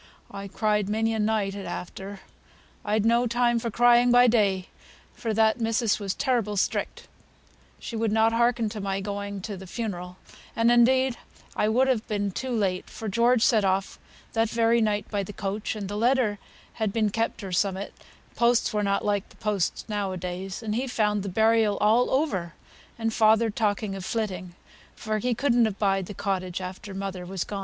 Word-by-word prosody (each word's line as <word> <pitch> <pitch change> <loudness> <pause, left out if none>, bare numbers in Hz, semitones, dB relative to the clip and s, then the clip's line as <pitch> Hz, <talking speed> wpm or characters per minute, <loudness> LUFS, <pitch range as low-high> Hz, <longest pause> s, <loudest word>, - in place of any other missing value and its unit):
I 200 0 -7
cried 210 0 0
many 225 +1 +1
a 220 - -2
night 210 -2 0
at 200 -1 -6
after; 195 +2 -7 0.6
I'd 210 0 0
no 235 +2 +3
time 240 0 +2
for 230 - -3
crying 240 +2 +5
by 245 0 +7
day, 200 -6 +2 0.5
for 225 - -3
that 220 +2 +2
missis 225 -1 +1
was 195 -2 -3
terrible 230 -6 0
strict; - - -2 0.7
she 235 - -7
would 225 -1 0
not 220 +1 +3
hearken 235 -1 +2
to 210 0 -6
my 195 0 -2
going 200 0 -4
to 205 +1 -5
th' 190 -1 -11
funeral; 180 -6 -5 0.4
and 230 +1 +3
indeed 255 +1 +4 0.4
I 210 - +1
would 255 +4 +3
have 245 -5 0
been 205 -2 -1
too 260 +7 -4
late, 195 -6 -1
for 220 - -7
George 235 +3 +3
set 225 -5 +4
off 190 0 0 0.3
that 225 -1 +1
very 230 +1 +2
night 210 -1 0
by 205 -2 -1
th' 200 +2 -10
coach, 205 +2 -3
and 205 -2 -5
th' - - -7
letter 225 -1 +1 0.4
had 215 -2 +1
been 215 -1 +1
kept 225 0 -2
or 190 - -6
summut 190 +2 -1 0.4
(posts 235 -1 +2
were 210 - +1
not 200 -1 0
like 205 -1 0
th' - - -21
posts 210 -5 -1
now 205 -3 -2
a - - -4
days), 185 +4 -5
and 215 -1 -2
he 250 +4 -1
found 210 -4 0
the 200 - -4
burial 220 +1 +3
all 225 +4 +3
over, 195 - -1 0.4
and 225 -1 -1
father 220 0 +4
talking 205 -2 -1
o' 195 - -6
flitting; 185 -4 -3 0.4
for 215 0 -2
he 245 +2 0
couldn't 240 -3 +3
abide 195 -3 0
the 205 - -8
cottage 185 -3 -2
after 190 +2 -7
mother 195 -2 -4
was 185 0 -3
gone." 200 - -5
215 Hz, 190 wpm, -26 LUFS, 195-230 Hz, 0.7 s, by